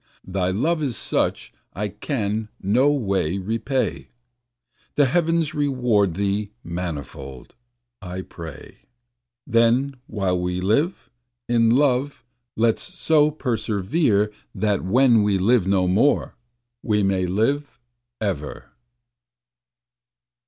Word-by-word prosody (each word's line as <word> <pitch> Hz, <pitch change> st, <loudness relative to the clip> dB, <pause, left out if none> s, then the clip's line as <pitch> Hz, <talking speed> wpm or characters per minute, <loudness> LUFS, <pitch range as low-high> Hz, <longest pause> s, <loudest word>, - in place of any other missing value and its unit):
Thy 95 Hz, -1 st, -1 dB
love 155 Hz, -, 0 dB
is 135 Hz, -6 st, -1 dB
such -, -, -1 dB, 0.2 s
I 105 Hz, +2 st, -2 dB
can 105 Hz, -1 st, -3 dB
no 120 Hz, +9 st, +3 dB
way 100 Hz, -, 0 dB
repay, 115 Hz, +7 st, -2 dB, 0.9 s
The 145 Hz, -, +5 dB
heavens 165 Hz, +2 st, +1 dB
reward 125 Hz, -, +1 dB
thee 100 Hz, +1 st, -1 dB
manifold, 75 Hz, -6 st, -6 dB, 0.5 s
I 90 Hz, 0 st, -6 dB
pray. 80 Hz, -6 st, -10 dB, 0.7 s
Then 120 Hz, +4 st, +2 dB
while 95 Hz, -4 st, -1 dB
we 90 Hz, 0 st, -2 dB
live, 125 Hz, -, 0 dB, 0.4 s
in 115 Hz, -1 st, +3 dB
love 135 Hz, +2 st, +2 dB, 0.3 s
let's 115 Hz, 0 st, +2 dB
so 160 Hz, -4 st, +2 dB
perservere 110 Hz, -, 0 dB, 0.2 s
That 105 Hz, -2 st, 0 dB
when 120 Hz, +4 st, +4 dB
we 105 Hz, -1 st, +2 dB
live 100 Hz, +1 st, +3 dB
no 95 Hz, -2 st, +2 dB
more, 110 Hz, +11 st, +2 dB, 0.5 s
we 105 Hz, -2 st, +1 dB
may 95 Hz, -2 st, +1 dB
live 135 Hz, +10 st, 0 dB, 0.4 s
ever. 90 Hz, -9 st, -4 dB
110 Hz, 105 wpm, -23 LUFS, 95-135 Hz, 0.9 s, The